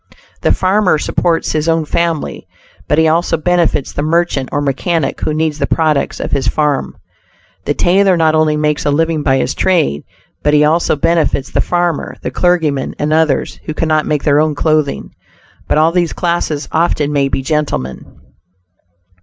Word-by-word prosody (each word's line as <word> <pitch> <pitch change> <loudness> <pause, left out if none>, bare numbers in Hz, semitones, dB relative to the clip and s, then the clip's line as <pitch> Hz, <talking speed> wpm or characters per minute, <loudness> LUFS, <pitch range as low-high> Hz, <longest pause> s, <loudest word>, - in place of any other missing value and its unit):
The - - +2
Farmer 190 -2 +2
supports 165 +2 -1
his 155 +1 -1
own 165 -1 +1
family, 165 0 -2 0.4
but 150 - +1
he 160 0 +4
also 165 +2 +1
benefits 170 -3 0
the - - -3
merchant 155 -4 0
or 145 - -1
mechanic 145 +3 -1
who - - -1
needs 155 0 -1
the 140 - 0
products 155 -3 0
of - - -4
his 135 -3 0
farm. 150 +1 -1 0.7
The 145 - 0
tailor 190 +1 +3
not 160 -1 +3
only 155 -1 +2
makes 150 0 0
a - - 0
living 160 +1 +1
by 135 -2 +2
his 130 - -1
trade, 160 - +1 0.4
but 150 0 +2
he 150 - +5
also 160 +2 +2
benefits 160 -3 0
the - - +1
farmer, 175 -3 -1
the - - -3
clergyman 160 -6 0
and 150 +1 -1
others 155 -3 0
who 155 - -5
cannot 155 -1 0
make 150 -2 -1
their 145 -1 +3
own 155 -1 0
clothing. 155 -2 0 0.6
But - - +1
all 160 +2 +4
these 175 -1 0
classes 170 -4 -2
often 155 -3 0
may 140 -1 +2
be 135 - -2
gentlemen. 140 - -2
155 Hz, 170 wpm, -15 LUFS, 145-165 Hz, 0.7 s, he